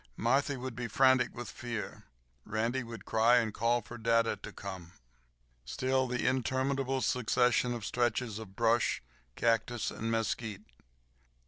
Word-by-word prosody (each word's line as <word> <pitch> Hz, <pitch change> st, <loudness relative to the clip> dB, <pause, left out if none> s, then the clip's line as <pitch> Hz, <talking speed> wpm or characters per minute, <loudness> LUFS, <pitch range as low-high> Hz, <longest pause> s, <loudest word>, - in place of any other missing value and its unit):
Marthy 135 Hz, +4 st, +1 dB
would 130 Hz, -1 st, -5 dB
be 120 Hz, 0 st, -3 dB
frantic 130 Hz, 0 st, +3 dB
with 120 Hz, -2 st, -6 dB
fear. 120 Hz, -3 st, -6 dB, 0.4 s
Randy 115 Hz, +4 st, -1 dB
would 115 Hz, -1 st, -8 dB
cry, 115 Hz, +2 st, +4 dB
and 110 Hz, -3 st, +1 dB
call 115 Hz, +2 st, +1 dB
for 120 Hz, +2 st, -9 dB
dada 115 Hz, 0 st, +3 dB
to -, -, -9 dB
come. 95 Hz, -3 st, -8 dB, 0.7 s
Still 130 Hz, -, 0 dB
the 125 Hz, 0 st, -2 dB
interminable 130 Hz, +1 st, 0 dB
succession 125 Hz, 0 st, +2 dB
of 115 Hz, -3 st, -6 dB
stretches 120 Hz, -1 st, 0 dB
of 100 Hz, -4 st, -10 dB
brush, 115 Hz, -, +2 dB, 0.3 s
cactus, 115 Hz, 0 st, +1 dB
and 115 Hz, -, -4 dB
mesquite. 110 Hz, -2 st, -2 dB
120 Hz, 135 wpm, -31 LUFS, 110-125 Hz, 0.7 s, cry